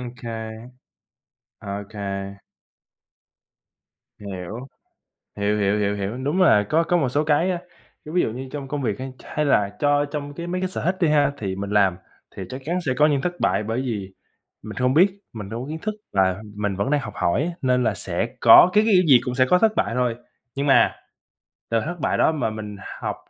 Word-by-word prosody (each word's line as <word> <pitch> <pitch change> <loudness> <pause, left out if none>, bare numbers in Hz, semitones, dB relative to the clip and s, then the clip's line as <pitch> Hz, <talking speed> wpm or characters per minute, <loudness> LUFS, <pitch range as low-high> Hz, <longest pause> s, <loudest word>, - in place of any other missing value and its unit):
OK. 125 0 -8 1.4
OK. 100 +1 -7 2.2
Hiểu. 100 +1 -6 0.8
Hiểu, 105 +1 0
hiểu, 100 +1 +2
hiểu, 100 0 0
hiểu, 100 +4 -4
đúng 145 +8 0
là 105 - +5
có 165 +2 +3
có 175 +1 +1
một 140 -6 +1
số 145 +4 +1
cái, 155 +5 +2
á, 180 - -1 0.5
cái 155 - -8
ví 180 - +3
dụ - - -1
như 130 +3 -6
trong 140 -2 -6
công 145 +1 -3
việc 110 -4 -2
hay 130 0 -5
hay 150 - -2
là 100 -7 +2
cho 145 0 +2
trong 145 0 -6
cái 170 +3 -6
mấy 180 +1 -2
cái 185 - 0
sở - - -4
thích 185 +2 +1
đi 170 - +3
ha, 145 -2 +3
thì 95 -7 -3
mình 100 +1 -5
làm 100 -3 +3 0.4
thì 95 - -5
chắc 130 - -7
chắn 175 +3 -1
sẽ 130 - +1
có 150 0 +5
những 140 -3 +1
thất 175 +2 -3
bại - - +1
bởi 115 +4 -2
vì 105 -7 -4 0.5
mình - - -8
không 125 +1 +2
biết, 180 +6 +6 0.2
mình 105 -3 -7
đâu 115 +3 -5
có - - -8
kiến 160 +1 -5
thức 215 0 -3 0.2
là 95 0 +1
mình 105 -2 -2
vẫn 100 +5 -1
đang 145 -1 +2
học - - -7
hỏi 85 +12 +1
á, 175 - -2
nên 125 -1 +2
là - - +1
sẽ - - -2
có - - +8
cái 210 - +5
cái, 220 -2 +2
kiểu 185 - +6
gì, 130 -4 +7
cũng 125 - -3
sẽ 130 0 +4
có 180 - +5
thất 220 +2 +4
bại - - 0
thôi. 125 -2 +1 0.4
Nhưng 140 +1 -1
mà, 135 - +4 0.8
từ 115 0 +2
thất 175 +8 -4
bại - - 0
đó 160 - +4
mà 130 -8 -1
mình 105 -1 -7 0.2
học - - -3
130 Hz, 220 wpm, -23 LUFS, 105-150 Hz, 2.2 s, có